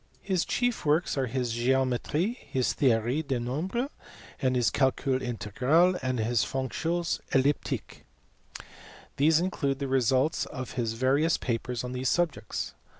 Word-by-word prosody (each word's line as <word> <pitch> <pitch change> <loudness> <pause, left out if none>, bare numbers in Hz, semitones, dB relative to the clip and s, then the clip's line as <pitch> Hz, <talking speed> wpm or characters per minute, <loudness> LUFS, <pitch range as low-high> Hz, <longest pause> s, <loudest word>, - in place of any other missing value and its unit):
His 185 -3 0
chief 245 -1 0
works 155 +3 +2
are 135 -2 0
his 125 -1 -2
Geometrie, 130 - +1
his 130 -2 +1
Theorie 120 +2 +2
des 135 -4 -2
nombres, 175 - -2 0.5
his 125 -3 +2
Calcul 130 0 +1
integral, 125 - +2
and 130 -1 -1
his 115 +1 +1
Fonctions 165 +6 -2
elliptiques. 140 +2 0 1.2
These 155 +3 +4
include 145 -6 -1
the 140 0 -3
results 130 +3 +2
of 130 -3 -6
his 115 -3 -2
various 135 +7 +2
papers 120 0 -3
on 125 - -4
these 130 0 -1
subjects. 175 -3 -1
130 Hz, 130 wpm, -28 LUFS, 125-160 Hz, 1.2 s, These